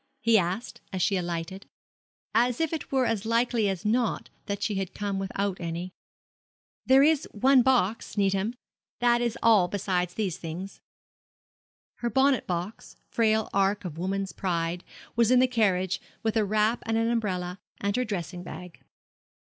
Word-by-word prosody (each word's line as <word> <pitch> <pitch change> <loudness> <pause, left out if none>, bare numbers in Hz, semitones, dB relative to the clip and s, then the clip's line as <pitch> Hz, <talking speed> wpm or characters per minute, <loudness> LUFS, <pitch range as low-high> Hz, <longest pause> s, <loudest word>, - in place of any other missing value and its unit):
he 230 -3 +3
asked, 190 +4 0
as 190 - -3
she 195 +3 +2
alighted; 175 +2 -4 0.7
as 240 +1 +2
if 325 0 0
it 320 - -5
were 265 -2 +2
as 225 -3 0
likely 230 -1 +1
as 190 +1 -4
not 235 +2 0 0.2
that 200 0 -3
she 215 - 0
had 195 -2 -3
come 200 -1 -2
without 195 0 -2
any. 170 +2 -4 0.9
'There 265 +1 +7
is 310 0 +3
one 260 +5 +5
box, 235 -5 +1
Needham. 195 +3 +1 0.4
That 240 0 +3
is 235 -1 -1
all 215 -6 +5
besides 180 -2 -1
these 195 -6 -1
things.' 175 +4 -7 1.2
Her 240 - -2
bonnet 265 +1 +2
box 180 +4 -4 0.2
frail 220 -1 +2
ark 195 +1 +1
of 165 -2 -6
woman's 195 +2 -2
pride 170 -1 -2 0.3
was 235 -1 +3
in 255 - +5
the 255 - +6
carriage, 195 -7 +1 0.2
with 220 -1 0
a 220 -2 +3
wrap 215 +3 +1
and 225 0 +1
an 225 0 +2
umbrella, 190 -6 -1 0.2
and 200 0 -1
her 250 - +1
dressing 185 -5 -4
bag. 180 0 -9
205 Hz, 160 wpm, -27 LUFS, 185-235 Hz, 1.2 s, There